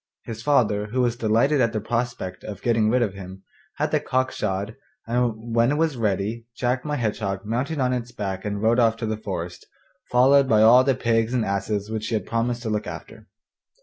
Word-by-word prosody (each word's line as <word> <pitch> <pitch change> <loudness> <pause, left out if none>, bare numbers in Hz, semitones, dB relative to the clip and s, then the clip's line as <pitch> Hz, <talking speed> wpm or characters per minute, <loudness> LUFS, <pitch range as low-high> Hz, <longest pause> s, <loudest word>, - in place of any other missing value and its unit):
His 115 -1 -7
father, 110 -6 +2
who 125 +4 -1
was 120 -1 +1
delighted 120 +6 +2
at 115 -2 +1
the 110 - 0
prospect 115 -4 -3
of 100 -3 -8
getting 115 -2 +2
rid 125 +1 +3
of 105 -5 -2
him, 95 0 -10 0.3
had - - -1
the - - +2
cock 130 0 0
shod, 100 +3 -3 0.3
and 115 -1 -1
when 115 +1 +3
it 145 - +1
was 160 -2 +1
ready 110 +1 -2
Jack 125 +1 -1
my 150 -1 -2
Hedgehog 105 -5 -2
mounted 125 +8 -2
on 130 -2 +1
its 120 -1 -4
back 100 -5 -4
and 105 0 -3
rode 115 +2 +3
off 115 -1 +3
to 115 - -3
the 110 0 -1
forest, 95 -5 -6 0.4
followed 135 +2 +5
by 110 -1 +5
all 120 +3 +7
the 135 -1 +2
pigs 115 0 +1
and 120 -3 +1
asses 100 +1 -2
which 110 -1 -3
he 115 - -1
had 105 - -2
promised 120 +1 -1
to 110 - -3
look 105 -1 -2
after. - - -9
115 Hz, 215 wpm, -24 LUFS, 105-125 Hz, 0.4 s, all